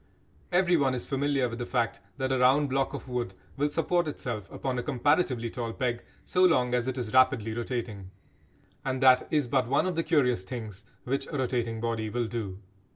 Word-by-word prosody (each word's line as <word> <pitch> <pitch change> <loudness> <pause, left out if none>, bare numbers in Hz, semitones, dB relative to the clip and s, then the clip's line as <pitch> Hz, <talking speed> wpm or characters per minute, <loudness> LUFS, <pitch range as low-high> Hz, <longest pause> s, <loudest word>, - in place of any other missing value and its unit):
Everyone 175 -7 +3
is 125 - -4
familiar 140 -1 +1
with 115 0 -6
the 120 - -2
fact 115 -2 0 0.2
that 130 -1 -1
a 130 - +1
round 135 +3 +4
block 135 0 0
of - - -8
wood 120 -6 -3 0.2
will 145 +1 +1
support 170 +2 +1
itself 115 -8 -5
upon 130 -2 -2
a - - 0
comparatively 130 -3 +1
tall 115 -3 -4
peg 120 -2 -2 0.2
so 185 - +2
long 125 -9 +4
as 125 0 +1
it 130 0 -2
is 115 -4 -4
rapidly 130 -4 +4
rotating. 115 -5 -4 0.7
And 130 -1 -1
that 130 -1 +6
is 150 -5 +1
but 130 -1 +1
one 140 +6 +2
of 185 -2 -1
the 165 - +1
curious 140 - +2
things 105 -2 -7 0.2
which 135 +2 -1
a 145 - -4
rotating 120 -3 -1
body 115 -1 -2
will 120 +2 -1
do. 110 -5 -4
125 Hz, 195 wpm, -28 LUFS, 115-140 Hz, 0.7 s, that